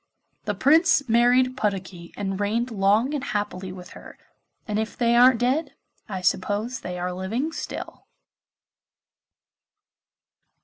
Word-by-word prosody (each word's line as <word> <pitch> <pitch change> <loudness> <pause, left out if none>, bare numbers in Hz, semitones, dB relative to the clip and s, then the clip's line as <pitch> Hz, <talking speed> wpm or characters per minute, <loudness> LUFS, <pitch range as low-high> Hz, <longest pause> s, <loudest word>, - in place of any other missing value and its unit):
The 210 -2 -2
Prince 290 - +4
married 245 +2 +3
Puddocky 190 -6 -3
and 195 -1 -3
reigned 230 +4 -1
long 210 +6 +2
and 285 -3 -2
happily 195 -5 -3
with 180 -1 -10
her, - - -13 0.5
and 210 -1 -1
if 220 -1 -4
they 235 -1 +2
aren't 245 0 +6
dead 270 +5 0 0.3
I 190 -3 -4
suppose 205 +7 -1
they 180 0 -6
are 180 +1 -3
living 220 - -3
still. - - -7
220 Hz, 125 wpm, -24 LUFS, 195-255 Hz, 0.5 s, aren't